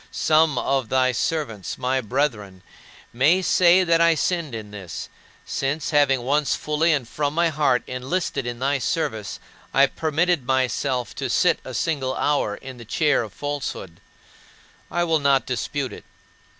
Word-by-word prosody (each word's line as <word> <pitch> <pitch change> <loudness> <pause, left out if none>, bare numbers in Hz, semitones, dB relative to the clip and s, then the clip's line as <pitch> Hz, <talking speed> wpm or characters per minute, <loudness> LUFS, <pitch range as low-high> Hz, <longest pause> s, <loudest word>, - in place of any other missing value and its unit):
Some 155 -3 +2
of 135 -4 0
thy 130 -1 +3
servants, 120 - -3
my 130 +1 0
brethren, 110 -7 -2 0.5
may 155 +10 +3
say 180 +1 +5
that 170 -1 +3
I 170 -1 +5
sinned 160 -5 -1
in 105 -2 -8
this, 95 -5 -7 0.4
since 140 +3 -2
having 140 -4 +3
once 145 +3 +1
fully 155 +2 +1
and 140 -6 0
from 145 +3 -2
my 170 0 +3
heart 145 -5 +1
enlisted 135 +1 -3
in 120 0 -4
thy 135 +3 0
service, 110 -8 -2 0.4
I 135 - +7
permitted 160 +2 0
myself 130 -1 0
to - - -3
sit - - +3
a - - -7
single 135 -5 -1
hour 145 -8 0
in 130 +1 -10
the 120 - -10
chair 145 +6 +1
of 110 -3 -6
falsehood. 140 -11 -5 0.9
I 175 - 0
will 165 -2 +2
not 140 -2 +2
dispute 130 +2 -3
it. - - -11
140 Hz, 155 wpm, -23 LUFS, 125-155 Hz, 0.9 s, I